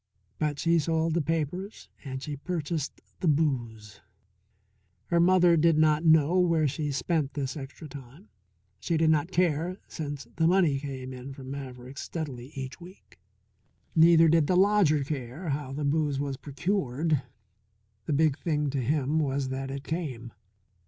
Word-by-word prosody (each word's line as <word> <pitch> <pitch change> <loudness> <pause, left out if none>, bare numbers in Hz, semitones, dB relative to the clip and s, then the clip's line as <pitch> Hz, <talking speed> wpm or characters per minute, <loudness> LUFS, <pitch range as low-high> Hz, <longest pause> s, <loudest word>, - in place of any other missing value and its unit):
But 150 -2 0
she 165 +2 +2
sold 160 +1 0
the 170 - +1
papers 165 +6 -3 0.2
and 130 -2 -6
she 150 - -4
purchased 160 -1 -4 0.2
the 180 - -1
booze. 120 -9 -1 1.1
Her 170 - +3
mother 175 0 +5
did 165 0 +4
not 155 0 +3
know 160 +2 +5
where 165 -4 +3
she 145 +2 -2
spent 140 +1 -1
this 135 -2 -3
extra 140 +2 -8
time. 140 - -12 0.5
She 165 - -1
did 160 0 +4
not 155 +2 +1
care 175 0 +1
since 145 -3 -5
the 160 0 +3
money 170 -6 +3
came 130 -2 -6
in 130 +2 -8
from 135 -1 -9
Maverick's 130 -1 -7
steadily 135 -7 -5
each 135 +4 -6
week. 180 +3 -15 0.8
Neither 165 0 +7
did 160 -2 +4
the 180 - +3
lodger 190 -7 +4
care 140 +4 -5
how 140 -1 -3
the 145 +2 -3
booze 145 -1 +1
was 140 -1 -2
procured; 150 0 -1 0.9
the 150 - 0
big 155 0 +2
thing 150 -4 0
to 135 -1 -1
him 145 +4 +1
was 140 -2 -1
that 135 0 -4
it 135 0 -5
came. 135 -9 -4
150 Hz, 155 wpm, -28 LUFS, 135-165 Hz, 1.1 s, Neither